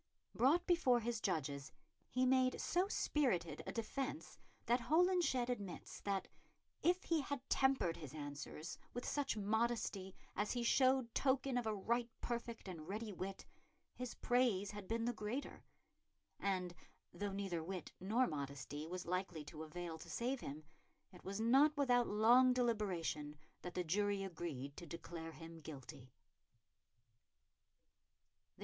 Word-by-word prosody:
Brought 305 +9 +4
before 270 -9 +4
his 230 -1 -2
judges, 145 -6 -1 0.4
he 255 +1 +2
made 255 0 +4
so 360 +3 +2
spirited 245 - +1
a - - -1
defence 270 +6 -3 0.3
that 240 +2 +3
Holinshed 320 -4 +3
admits 205 -8 -4
that 200 -1 -1 0.5
"if 360 +2 +3
he 330 -3 +2
had 280 -1 -4
tempered 265 -11 +3
his 150 -2 -8
answers 145 +2 -6 0.2
with 245 - -3
such 280 -6 0
modesty 215 -2 0 0.2
as 210 +1 0
he 245 -1 -1
showed 255 -1 +4
token 265 -1 +2
of 245 -2 +1
a 215 - +1
right 235 +4 0
perfect 235 -2 -4
and 165 -4 -6
ready 210 +2 -3
wit, 190 +2 -5 0.5
his 250 -1 -5
praise 235 -6 +2
had 205 -2 -7
been 230 0 0
the 240 - +1
greater"; 225 +6 -4 0.8
and 185 -3 0 0.4
though 205 -1 -2
neither 195 -4 -2
wit 180 0 -5
nor 220 +8 +3
modesty 145 - -4
was 180 +1 -4
likely 175 -3 -2
to 155 +1 -8
avail 160 +1 -5
to - - -10
save 250 +3 -1
him, 150 -6 -6 0.5
it 180 - -13
was 195 +2 -4
not 275 +7 +5
without 245 -4 +4
long 240 +5 +6
deliberation 190 -11 0 0.3
that 180 - -6
the 180 - +1
jury 200 +3 +1
agreed 155 -7 -5
to 170 - -7
declare 165 -1 -6
him 165 +1 -9
guilty. 135 -4 -9
210 Hz, 140 wpm, -39 LUFS, 170-250 Hz, 0.8 s, long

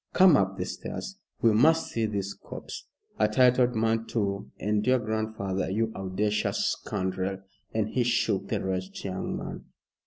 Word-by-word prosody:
"Come 185 -4 +7
up 95 -4 +1
the 90 - -2
stairs, 195 - -6 0.2
we 115 -2 +6
must 160 +9 +4
see 115 -1 0
this 100 -1 -2
corpse. - - -9 0.3
A 105 - +5
titled 125 +2 +4
man, 115 0 +1
too, 100 -3 -2
and 105 0 +1
your 130 0 +5
grandfather 110 -4 -2
you 110 +3 0
audacious 100 +2 0
scoundrel!" 95 -1 -2 0.3
and 110 -1 0
he 125 - 0
shook 115 -5 +1
the - - -2
wretched 95 0 -3
young 95 -1 -3
man. - - -6
105 Hz, 155 wpm, -28 LUFS, 95-115 Hz, 0.3 s, Come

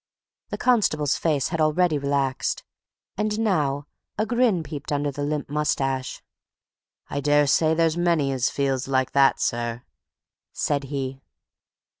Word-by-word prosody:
The - - -4
constable's 175 - +2
face 150 -5 0
had 165 -2 -1
already 155 0 +2
relaxed, 140 -1 -1 0.5
and 210 +1 -1
now 150 -10 0 0.3
a 215 - +1
grin 230 -6 +2
peeped 145 -1 -7
under 145 0 0
the 145 - -6
limp 145 0 -2
moustache. 135 -3 -1 0.9
"I 140 - -1
daresay 145 +2 +3
there's 165 0 +2
many 170 -5 +2
as 130 -1 +1
feels 135 -2 -1
like 130 -1 +1
that, 140 -1 +4
sir," 120 0 -2 0.7
said 140 -1 -1
he. 135 -1 -4
145 Hz, 130 wpm, -24 LUFS, 135-165 Hz, 0.9 s, that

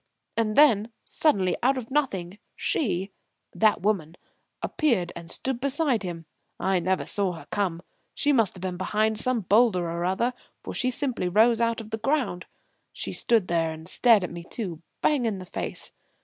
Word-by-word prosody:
And 220 -2 0
then, 235 -7 +5 0.2
suddenly 195 - +2
out 265 +2 +3
of 250 -1 -6
nothing 200 -10 -1 0.2
she 195 - -1 0.4
that 215 -4 +3
woman 175 -6 0 0.5
appeared 235 - +1
and 170 -1 -9
stood 260 -2 -3
beside 280 -3 +1
him. 170 -4 -6 0.3
I 190 -1 +1
never 185 +2 0
saw 195 -3 +2
her 165 - -10
come. 180 -4 -1 0.3
She 290 -1 +2
must 225 -8 +2
have 185 - -10
been 180 -1 -3
behind 215 +3 0
some 250 -1 +1
boulder 200 -2 +3
or 170 +1 -3
other, 190 +8 0 0.3
for - - -6
she 255 - +1
simply 250 -8 -1
rose 225 +5 +4
out 230 0 +1
of 220 -1 -9
the 220 - -3
ground. 230 -8 -1 0.4
She - - -5
stood 225 -6 +2
there 165 -1 +1
and 160 0 -9
stared 225 0 +4
at 180 - -4
me 170 0 -7
too 175 -4 -5 0.2
bang 275 -6 +2
in 210 -3 -1
the 185 - -8
face. - - -5
210 Hz, 175 wpm, -26 LUFS, 180-240 Hz, 0.5 s, then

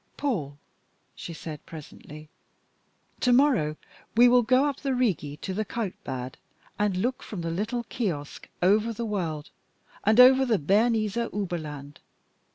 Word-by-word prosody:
"Paul," 155 - -2 0.6
she - - -8
said 155 -2 -8
presently, 155 -1 -11 0.9
"to 250 - +2
morrow 245 - +3 0.4
we 245 +1 +8
will 245 0 +6
go 255 +4 +3
up 285 -3 -1
the 275 -2 -2
Rigi 170 - -1
to 190 - -5
the 215 +3 -1
Kaltbad, 180 - -5 0.4
and 205 -3 +1
look 250 +7 -1
from 195 -5 -6
the 165 0 -3
little 215 +7 -2
kiosk 175 - -4
over 215 +5 +3
the 235 +1 -4
world, 170 -8 -3 0.5
and 215 +3 +3
over 260 +1 +8
the 235 -5 +2
Bernese 215 +6 +1
Oberland. 160 -10 -4
205 Hz, 140 wpm, -26 LUFS, 155-240 Hz, 0.9 s, we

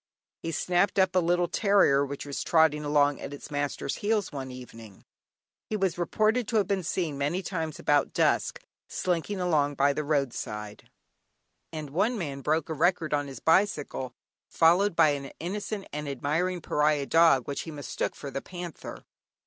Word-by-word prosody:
He 165 - -3
snapped 175 +5 +1
up 190 -1 +3
a - - +6
little 175 0 +2
terrier 195 -7 +3
which 140 0 -5
was 140 -1 -4
trotting 160 -2 +3
along 145 -1 +2
at 145 - -6
its 145 - -11
master's 145 -1 -2
heels 210 -1 0
one 135 -3 -5
evening; 115 -5 -11 0.6
he 215 - -1
was 190 -3 0
reported 215 +6 +1
to 235 - -3
have 210 -2 +4
been 195 -1 0
seen 160 -4 -2
many 160 +7 -1
times 160 -5 -3
about 145 -1 +2
dusk, - - +1 0.2
slinking 185 +2 -2
along 150 -5 +1
by 140 +1 +3
the 150 - -2
road 140 -4 0
side, 105 0 -7 0.8
and 155 -3 -6
one 215 - +1
man 140 -7 -4
broke 155 +2 0
a 160 - -3
record 165 0 +1
on 145 -1 0
his 135 -3 -8
bicycle, 160 -7 +1 0.4
followed 175 +4 +4
by 155 - +6
an 140 -1 -3
innocent 200 +3 -4
and 150 -1 -4
admiring 165 +7 -1
pariah 150 -2 +1
dog 160 -5 +4
which 140 - -3
he - - -8
mistook 145 -3 -4
for 140 - -7
the 135 - -4
panther. 175 -3 -8
155 Hz, 175 wpm, -28 LUFS, 140-180 Hz, 0.8 s, a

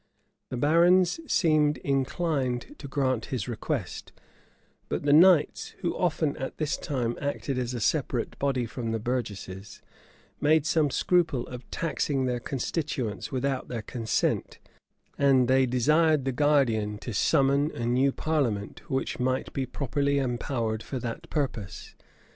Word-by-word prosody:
The 125 - -4
barons 175 - +4
seemed 155 -3 +3
inclined 140 - -1
to 140 - -7
grant 130 -4 0
his 125 -4 -3
request; 120 - -4 0.8
but - - -2
the 145 0 +3
knights, 170 -1 +4
who 175 - -1
often, 160 -4 0
at 135 - -5
this 155 -1 -1
time, 120 -6 -2
acted 140 -2 -2
as 125 0 -3
a - - -3
separate - - -1
body 135 -3 0
from 115 0 -4
the 115 - -1
burgesses, 105 -5 -4 0.6
made 155 0 +4
some 155 -2 +2
scruple 150 -5 +1
of 125 0 -10
taxing 145 -5 -1
their 125 -1 -1
constituents 130 - -3
without 135 0 -1
their 115 -3 -5
consent; 115 -1 -1 0.6
and 135 -3 +4
they 130 +1 +4
desired 150 +4 +3
the 135 - +1
guardian 125 -7 +2
to 115 +2 -6
summon 140 +7 +3
a 120 - -5
new 130 +3 +3
parliament, 130 -11 -1
which 135 -2 -2
might 130 +1 -1
be 135 -2 -2
properly 140 +2 -1
empowered 120 -4 -1
for 130 - -5
that 125 +8 -6
purpose. 125 - -4
135 Hz, 140 wpm, -27 LUFS, 120-150 Hz, 0.8 s, barons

